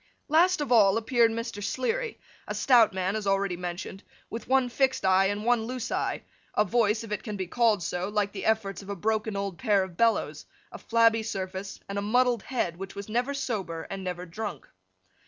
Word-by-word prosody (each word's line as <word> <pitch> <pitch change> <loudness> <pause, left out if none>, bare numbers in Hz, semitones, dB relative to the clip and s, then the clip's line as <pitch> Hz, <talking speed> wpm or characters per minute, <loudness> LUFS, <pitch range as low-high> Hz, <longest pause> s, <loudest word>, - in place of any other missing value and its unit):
Last 340 +3 +4
of 280 -4 -3
all 210 -3 +6
appeared 230 +1 +3
Mr. 230 -2 -4
Sleary: 440 - -2 0.3
a - - -3
stout 240 -5 +5
man 190 +1 -1
as 215 -2 -3
already 195 -2 +1
mentioned, 180 +2 -6 0.3
with 230 0 -6
one 265 -1 +3
fixed 260 0 +1
eye, 190 +1 +5
and 205 +2 -3
one 240 -2 +2
loose 250 0 -4
eye, - - -1 0.3
a 210 - +3
voice 215 +1 +1
(if 225 - -9
it 210 - -2
can 210 -4 -5
be 190 - -2
called 220 -1 +2
so) 180 +4 -2
like 205 -1 0
the 195 -2 -6
efforts 215 -3 0
of 195 - -12
a 200 - -3
broken 215 +2 -1
old 200 -3 -3
pair 205 -6 +3
of 180 -3 -9
bellows, 230 -1 +1 0.2
a - - -9
flabby 230 -1 +3
surface, 195 -2 -5
and 200 0 -3
a - - -2
muddled 240 +2 +2
head 185 -10 -2
which 195 +1 -7
was 200 +1 -7
never 245 +5 0
sober 190 -11 -3
and 195 -1 -5
never 180 -1 -4
drunk. 210 +5 -6
210 Hz, 205 wpm, -27 LUFS, 195-235 Hz, 0.3 s, all